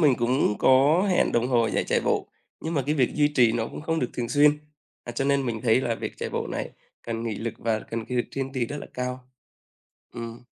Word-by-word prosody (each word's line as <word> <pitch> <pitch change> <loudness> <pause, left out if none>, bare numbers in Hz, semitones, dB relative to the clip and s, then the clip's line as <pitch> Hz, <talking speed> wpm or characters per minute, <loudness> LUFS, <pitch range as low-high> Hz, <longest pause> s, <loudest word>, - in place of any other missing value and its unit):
mình 145 -6 +5
cũng 120 -3 +1
có 145 +9 +5
hẹn 180 - +2
đồng 120 +1 +1
hồ 120 -3 +3
dậy - - 0
chạy - - +1
bộ, - - 0 0.3
nhưng 165 +1 -3
mà 140 - +1
cái 150 - +1
việc 130 -5 +1
duy 150 -1 +3
trì 120 -4 +5
nó 115 -1 -1
cũng - - -8
không 165 +1 -1
được 125 - -1
thường 120 -2 -3
xuyên. 150 0 +4 0.5
À, 120 - -6
cho 125 +3 -1
nên 140 -1 +2
mình 110 -2 -2
thấy 120 +1 +4
là 120 -3 -1
việc - - -5
chạy - - -4
bộ - - -2
này - - -4 0.3
cần 115 -1 -4
nghị 115 -2 -2
lực 115 +2 -4
và 110 -1 0
cần 115 +1 -5
cái 125 - -4
lực 120 - 0
kiên 135 -1 -4
trì 130 -3 -1
rất 145 - -5
là - - -8
cao. 125 0 -3 0.9
Ừm. 115 0 -7
125 Hz, 250 wpm, -26 LUFS, 115-140 Hz, 0.9 s, mình